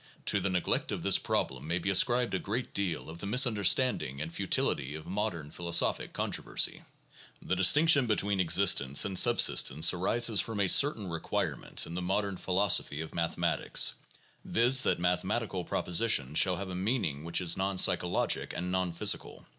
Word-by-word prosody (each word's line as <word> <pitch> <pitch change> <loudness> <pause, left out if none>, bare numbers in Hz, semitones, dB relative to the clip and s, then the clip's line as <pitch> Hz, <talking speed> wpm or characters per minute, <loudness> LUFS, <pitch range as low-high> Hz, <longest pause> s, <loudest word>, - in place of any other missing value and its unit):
To - - +2
the 100 - -2
neglect 90 -1 -2
of - - -5
this - - +3
problem 65 +2 -3
may 85 +2 -1
be 95 +3 -2
ascribed 120 +4 +2
a 95 - -1
great 115 +5 -5
deal 90 -6 -4
of 80 +1 -10
the 100 - -6
misunderstanding 110 - +1
and 80 +3 -6
futility 70 -2 -1
of 80 - -10
modern 90 -7 -4
philosophic 85 0 0
controversy. - - -2 0.6
The 95 - -3
distinction 140 - +4
between 100 -2 0
existence 70 -5 +3
and 95 -2 +1
subsistence 80 +7 +3
arises 110 +4 +1
from 110 -2 -6
a 100 - +1
certain 115 -2 +3
requirement 85 -2 -2
in 85 - -9
the 90 - -4
modern 100 +1 -2
philosophy 90 -6 0
of 80 - -8
mathematics, 85 -1 0 0.5
viz., 125 +3 +3
that - - +1
mathematical 90 +1 -2
propositions 85 - +1
shall 90 -1 +2
have 95 +1 -6
a - - -6
meaning 90 - -3
which 85 +1 -2
is 85 -2 +2
non 95 0 -3
psychologic - - +1
and 90 +1 -4
non 95 -2 -2
physical. 85 - -2
95 Hz, 160 wpm, -29 LUFS, 85-105 Hz, 0.6 s, distinction